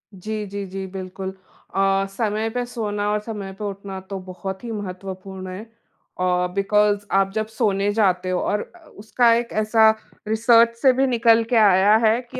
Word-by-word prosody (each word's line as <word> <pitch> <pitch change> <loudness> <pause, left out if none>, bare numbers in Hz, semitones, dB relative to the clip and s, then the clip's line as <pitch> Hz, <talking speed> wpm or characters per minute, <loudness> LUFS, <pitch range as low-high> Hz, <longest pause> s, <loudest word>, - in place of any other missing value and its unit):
जी, 215 +3 -5
जी, 200 0 -5
जी, 190 0 -6
बिल्कुल। 190 0 -6 0.4
अ, 195 0 +2
समय 215 +2 -1
पे 245 - -1
सोना 210 -4 -3
और 210 - +1
समय 210 -3 -6
पे - - -5
उठना 195 -1 -6
तो 195 - -4
बहुत 190 +2 -7
ही 235 - -5
महत्वपूर्ण 190 -2 -7
है। 185 +3 -6
अ, 180 -5 -4
बिकॉज़ 205 +1 +2
आप 195 0 +2
जब 220 - 0
सोने 205 -3 0
जाते 185 -4 +1
हो 180 - 0
और 210 0 -1
अ, 350 - -16 0.2
उसका 230 +3 +3
एक 235 0 -2
ऐसा 220 +1 +5 0.4
रिसर्च 230 +1 +4
से 265 -2 +6
भी 270 +1 +2
निकल 230 -2 +4
के 245 - +1
आया 205 -1 +5
है 220 +2 +4
कि 255 - -6
205 Hz, 180 wpm, -22 LUFS, 195-225 Hz, 0.4 s, से